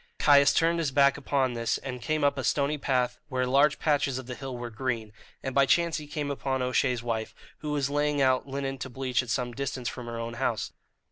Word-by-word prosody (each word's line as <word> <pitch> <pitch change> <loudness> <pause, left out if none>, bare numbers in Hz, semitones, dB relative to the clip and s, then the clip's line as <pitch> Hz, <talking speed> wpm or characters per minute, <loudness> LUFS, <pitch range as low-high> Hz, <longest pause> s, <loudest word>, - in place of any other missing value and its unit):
Caius 140 -1 +6
turned 170 +1 +2
his 160 -4 0
back 140 0 +4
upon 135 -2 0
this, 115 -1 0
and 125 -2 -6
came 155 +3 -1
up 140 0 +3
a 135 - -3
stony 145 +3 +1
path 125 -3 0
where 130 0 0
large 140 +4 +4
patches 145 -4 +1
of 130 - -6
the 125 - -6
hill 130 0 -6
were 120 -1 -6
green; 115 -2 -3 0.3
and 135 - -3
by 140 0 +4
chance 170 +1 +3
he 150 -2 -7
came 145 -1 -3
upon 135 -2 -2
O'Shea's 125 -1 +1
wife, 115 -2 -3 0.2
who 150 - -5
was 145 -2 0
laying 145 0 0
out 130 0 +2
linen 135 0 -3
to 130 - -5
bleach 130 -1 -1
at 125 - -9
some 125 +1 -1
distance 130 -1 -4
from 125 -2 -5
her 115 0 -5
own 115 0 -4
house. 115 -5 -1
135 Hz, 225 wpm, -28 LUFS, 125-140 Hz, 0.3 s, Caius